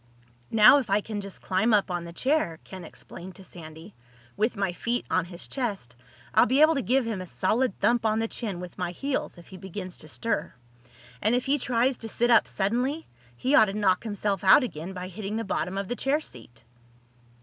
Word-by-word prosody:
"Now 220 Hz, +5 st, +7 dB
if 255 Hz, -, -5 dB
I 200 Hz, +1 st, +3 dB
can 210 Hz, -1 st, -5 dB
just 200 Hz, -1 st, -9 dB
climb 220 Hz, +4 st, +2 dB
up 200 Hz, -2 st, +1 dB
on 175 Hz, -1 st, -3 dB
the 170 Hz, -, -8 dB
chair," 255 Hz, -, 0 dB
Ken 190 Hz, -2 st, -9 dB
explained 175 Hz, +3 st, -10 dB
to 195 Hz, -, -13 dB
Sandy, 165 Hz, +1 st, -11 dB, 0.4 s
"with 215 Hz, +2 st, 0 dB
my 195 Hz, -3 st, 0 dB
feet 240 Hz, +6 st, -2 dB
on 185 Hz, -2 st, +2 dB
his 175 Hz, 0 st, -8 dB
chest, 200 Hz, -, -4 dB, 0.4 s
I'll -, -, +5 dB
be 265 Hz, +3 st, +3 dB
able 310 Hz, +1 st, +7 dB
to 275 Hz, -, 0 dB
give 255 Hz, 0 st, +1 dB
him 220 Hz, -5 st, -3 dB
a 185 Hz, -, -7 dB
solid 215 Hz, +6 st, 0 dB
thump 240 Hz, -1 st, +2 dB
on 220 Hz, -1 st, +2 dB
the 225 Hz, 0 st, 0 dB
chin 205 Hz, -6 st, -5 dB
with 180 Hz, -1 st, -9 dB
my 180 Hz, -1 st, -2 dB
heels 275 Hz, -1 st, -3 dB
if 170 Hz, -, -15 dB
he 190 Hz, -, -10 dB
begins 185 Hz, 0 st, -7 dB
to -, -, -8 dB
stir. 220 Hz, -, -3 dB, 0.7 s
And 220 Hz, +3 st, +3 dB
if 250 Hz, -, 0 dB
he 285 Hz, +2 st, +2 dB
tries 245 Hz, +1 st, +1 dB
to 225 Hz, -, -7 dB
sit 240 Hz, +3 st, +1 dB
up 230 Hz, -, +5 dB
suddenly 250 Hz, +10 st, -1 dB, 0.3 s
he 260 Hz, -, 0 dB
ought 220 Hz, -, +8 dB
to 195 Hz, -, -4 dB
knock 195 Hz, -2 st, +2 dB
himself 205 Hz, -3 st, -2 dB
out 190 Hz, +8 st, +7 dB
again 180 Hz, -5 st, -5 dB
by 180 Hz, 0 st, -6 dB
hitting 200 Hz, +2 st, -5 dB
the 225 Hz, -, -1 dB
bottom 190 Hz, -1 st, -2 dB
of 195 Hz, -1 st, -2 dB
the 245 Hz, -, -2 dB
chair 275 Hz, +4 st, +1 dB
seat." 120 Hz, -, -10 dB
205 Hz, 215 wpm, -27 LUFS, 185-240 Hz, 0.7 s, ought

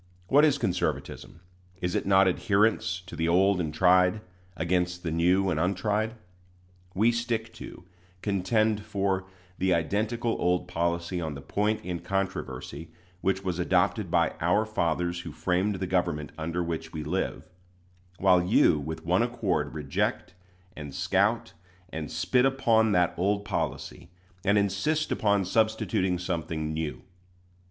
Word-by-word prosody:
What 145 Hz, +2 st, +6 dB
is 145 Hz, -2 st, +3 dB
conservatism? 90 Hz, -, -3 dB, 0.4 s
Is 90 Hz, -1 st, -2 dB
it -, -, -1 dB
not 95 Hz, -1 st, +5 dB
adherence 100 Hz, -1 st, +1 dB
to 90 Hz, -, -9 dB
the 80 Hz, 0 st, -1 dB
old 95 Hz, +2 st, +3 dB
and 80 Hz, -3 st, -2 dB
tried, 90 Hz, +4 st, +4 dB, 0.4 s
against 90 Hz, +1 st, -1 dB
the 80 Hz, -, -2 dB
new 90 Hz, +4 st, +2 dB
and 80 Hz, -, 0 dB
untried? 105 Hz, +5 st, 0 dB, 0.8 s
We 110 Hz, +5 st, +4 dB
stick 115 Hz, -1 st, -2 dB
to, 110 Hz, -, -10 dB, 0.4 s
contend 105 Hz, +2 st, +1 dB
for, 100 Hz, -2 st, -1 dB, 0.3 s
the 95 Hz, -1 st, +3 dB
identical 110 Hz, +7 st, -1 dB
old 90 Hz, 0 st, +1 dB
policy 85 Hz, +1 st, -1 dB
on 80 Hz, -3 st, -4 dB
the 70 Hz, -, -8 dB
point 105 Hz, +8 st, -1 dB
in 90 Hz, -1 st, -3 dB
controversy 95 Hz, -3 st, -4 dB, 0.3 s
which 95 Hz, +1 st, 0 dB
was 90 Hz, -2 st, -2 dB
adopted 90 Hz, +3 st, +1 dB
by 85 Hz, -1 st, +2 dB
"our 100 Hz, +6 st, +2 dB
fathers 85 Hz, -4 st, -1 dB
who -, -, -7 dB
framed 95 Hz, +3 st, 0 dB
the 95 Hz, 0 st, -3 dB
government 90 Hz, -5 st, -1 dB
under 85 Hz, +2 st, -2 dB
which 80 Hz, -1 st, -4 dB
we 80 Hz, -2 st, -5 dB
live"; -, -, -3 dB, 0.7 s
while 90 Hz, -2 st, +4 dB
you 90 Hz, -4 st, +4 dB
with 80 Hz, +2 st, -6 dB
one 90 Hz, +4 st, +3 dB
accord 100 Hz, -12 st, -1 dB
reject, 75 Hz, +4 st, -2 dB, 0.4 s
and 75 Hz, -3 st, -8 dB
scout, 100 Hz, +6 st, +1 dB, 0.4 s
and 80 Hz, -3 st, -5 dB
spit 125 Hz, -1 st, +1 dB
upon 115 Hz, -5 st, +3 dB
that 90 Hz, -1 st, +3 dB
old 100 Hz, +3 st, 0 dB
policy, -, -, -4 dB, 0.3 s
and 100 Hz, +1 st, +3 dB
insist 150 Hz, +10 st, 0 dB
upon 100 Hz, -2 st, +2 dB
substituting 105 Hz, -3 st, +1 dB
something 80 Hz, -3 st, -3 dB
new. 80 Hz, -1 st, -4 dB
95 Hz, 140 wpm, -27 LUFS, 85-105 Hz, 0.8 s, What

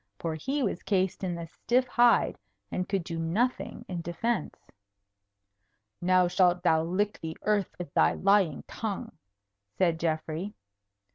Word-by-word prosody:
For 165 Hz, -1 st, -3 dB
he 270 Hz, -, -2 dB
was 180 Hz, -, -1 dB
cased 190 Hz, -1 st, 0 dB
in 180 Hz, -2 st, -1 dB
the 170 Hz, 0 st, -5 dB
stiff 245 Hz, +9 st, 0 dB
hide, 240 Hz, -2 st, +3 dB, 0.3 s
and 180 Hz, -, -2 dB
could 195 Hz, -3 st, 0 dB
do 165 Hz, -1 st, -5 dB
nothing 210 Hz, +11 st, -1 dB
in 175 Hz, -2 st, -4 dB
defence. 175 Hz, +5 st, -2 dB, 1.4 s
"Now 180 Hz, 0 st, +4 dB
shalt 175 Hz, 0 st, +3 dB
thou 160 Hz, -3 st, +4 dB
lick 200 Hz, +5 st, -1 dB
the 160 Hz, 0 st, -5 dB
earth 210 Hz, -3 st, +1 dB
with 175 Hz, -5 st, -7 dB
thy -, -, +4 dB
lying 195 Hz, -6 st, +2 dB
tongue," 210 Hz, -4 st, -4 dB, 0.7 s
said 170 Hz, -3 st, +2 dB
Geoffrey. 165 Hz, +4 st, -2 dB
180 Hz, 140 wpm, -29 LUFS, 165-205 Hz, 1.4 s, Now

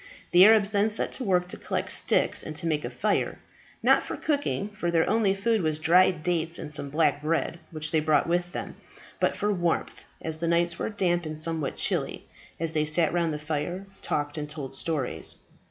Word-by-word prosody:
The 180 Hz, +1 st, +8 dB
Arabs 215 Hz, -2 st, +6 dB
then 205 Hz, +1 st, +2 dB
set 215 Hz, -, 0 dB
to 265 Hz, -, -4 dB
work 180 Hz, -4 st, +2 dB
to -, -, -5 dB
collect -, -, -3 dB
sticks -, -, +1 dB
and 155 Hz, -, -7 dB
to 170 Hz, -, -4 dB
make 155 Hz, -2 st, 0 dB
a -, -, -3 dB
fire -, -, 0 dB, 0.5 s
not -, -, +5 dB
for -, -, -6 dB
cooking, 285 Hz, -9 st, -1 dB
for 195 Hz, -4 st, -3 dB
their 165 Hz, -1 st, +2 dB
only 210 Hz, -4 st, +2 dB
food 220 Hz, +2 st, +1 dB
was 155 Hz, -2 st, 0 dB
dried 170 Hz, +1 st, +4 dB
dates 170 Hz, -1 st, 0 dB
and 150 Hz, -, -5 dB
some 140 Hz, -1 st, -3 dB
black 150 Hz, 0 st, +2 dB
bread, 165 Hz, +2 st, -1 dB
which 155 Hz, -1 st, -4 dB
they 160 Hz, -, +3 dB
brought 150 Hz, -1 st, +3 dB
with 175 Hz, +1 st, 0 dB
them -, -, -6 dB, 0.4 s
but -, -, +2 dB
for 210 Hz, 0 st, 0 dB
warmth, 175 Hz, -3 st, -1 dB, 0.2 s
as 160 Hz, -1 st, -3 dB
the 170 Hz, -, -1 dB
nights 170 Hz, +1 st, +1 dB
were -, -, -1 dB
damp 175 Hz, -4 st, 0 dB
and 155 Hz, 0 st, -5 dB
somewhat 155 Hz, -2 st, -2 dB
chilly, -, -, -2 dB, 0.3 s
as 165 Hz, 0 st, -1 dB
they 155 Hz, -, +2 dB
sat 155 Hz, +1 st, +2 dB
round 170 Hz, -2 st, +1 dB
the 150 Hz, -, -2 dB
fire, 155 Hz, +5 st, -3 dB, 0.2 s
talked, 145 Hz, +1 st, -2 dB
and 150 Hz, 0 st, -5 dB
told 145 Hz, -4 st, -6 dB
stories. 135 Hz, -, -3 dB
165 Hz, 205 wpm, -27 LUFS, 155-185 Hz, 0.5 s, The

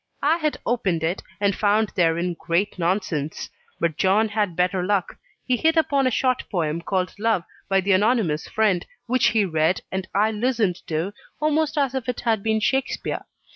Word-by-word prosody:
I 310 Hz, +4 st, +4 dB
had 305 Hz, -3 st, -1 dB
opened 190 Hz, -9 st, 0 dB
it, 170 Hz, +4 st, -1 dB, 0.2 s
and 200 Hz, -1 st, +2 dB
found 210 Hz, +1 st, +2 dB
therein 170 Hz, -1 st, +1 dB
great 180 Hz, +3 st, -1 dB
nonsense; 165 Hz, -4 st, -2 dB, 0.3 s
but 165 Hz, -3 st, 0 dB
John 210 Hz, +4 st, +3 dB
had 205 Hz, -4 st, -1 dB
better 180 Hz, +1 st, +1 dB
luck 195 Hz, -1 st, 0 dB, 0.3 s
he 255 Hz, -, +2 dB
hit 320 Hz, +5 st, +2 dB
upon 280 Hz, -4 st, +3 dB
a -, -, +4 dB
short 255 Hz, +1 st, +1 dB
poem 165 Hz, -3 st, -1 dB
called 185 Hz, +1 st, -1 dB
"Love," 220 Hz, -5 st, +1 dB, 0.3 s
by 195 Hz, 0 st, +3 dB
the 200 Hz, +2 st, 0 dB
Anonymous 200 Hz, -6 st, +2 dB
Friend, 205 Hz, -5 st, +1 dB, 0.2 s
which 250 Hz, +1 st, +2 dB
he 215 Hz, -2 st, +3 dB
read, 160 Hz, 0 st, +1 dB
and 190 Hz, -1 st, -3 dB
I 210 Hz, +2 st, +3 dB
listened 220 Hz, -5 st, 0 dB
to, 165 Hz, +5 st, -2 dB, 0.3 s
almost 305 Hz, 0 st, +1 dB
as 275 Hz, -3 st, +1 dB
if 260 Hz, -2 st, -3 dB
it 245 Hz, -, -3 dB
had 225 Hz, -4 st, +1 dB
been 220 Hz, +1 st, +1 dB
Shakspeare. 265 Hz, +4 st, -1 dB
205 Hz, 175 wpm, -23 LUFS, 180-240 Hz, 0.3 s, I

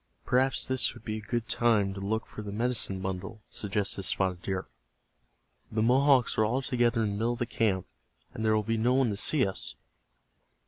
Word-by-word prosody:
"Perhaps 130 Hz, +2 st, +2 dB
this 130 Hz, -1 st, +1 dB
would -, -, -13 dB
be 110 Hz, -1 st, -2 dB
a -, -, -9 dB
good 120 Hz, +2 st, -3 dB
time 115 Hz, -5 st, +2 dB
to 95 Hz, -, -7 dB
look 110 Hz, +3 st, -1 dB
for -, -, -9 dB
the 105 Hz, -1 st, -6 dB
medicine 110 Hz, -3 st, -1 dB
bundle," 95 Hz, +3 st, -5 dB
suggested 100 Hz, -1 st, -2 dB
Spotted 95 Hz, -1 st, 0 dB
Deer. 95 Hz, -1 st, -3 dB, 1.1 s
"The 110 Hz, 0 st, +1 dB
Mohawks 130 Hz, +1 st, +4 dB
are -, -, +5 dB
all 125 Hz, +5 st, 0 dB
together 120 Hz, -3 st, +1 dB
in 105 Hz, -, 0 dB
the 100 Hz, -, -3 dB
middle 115 Hz, +3 st, +1 dB
of -, -, -6 dB
the 120 Hz, -, -1 dB
camp, 105 Hz, -6 st, 0 dB, 0.5 s
and 110 Hz, -, -5 dB
there 110 Hz, 0 st, +3 dB
will 105 Hz, -, +1 dB
be 115 Hz, +2 st, -1 dB
no 120 Hz, +3 st, +2 dB
one 130 Hz, -4 st, +3 dB
to 100 Hz, -, -3 dB
see 140 Hz, +6 st, +2 dB
us." 95 Hz, -, -2 dB
110 Hz, 200 wpm, -29 LUFS, 100-120 Hz, 1.1 s, are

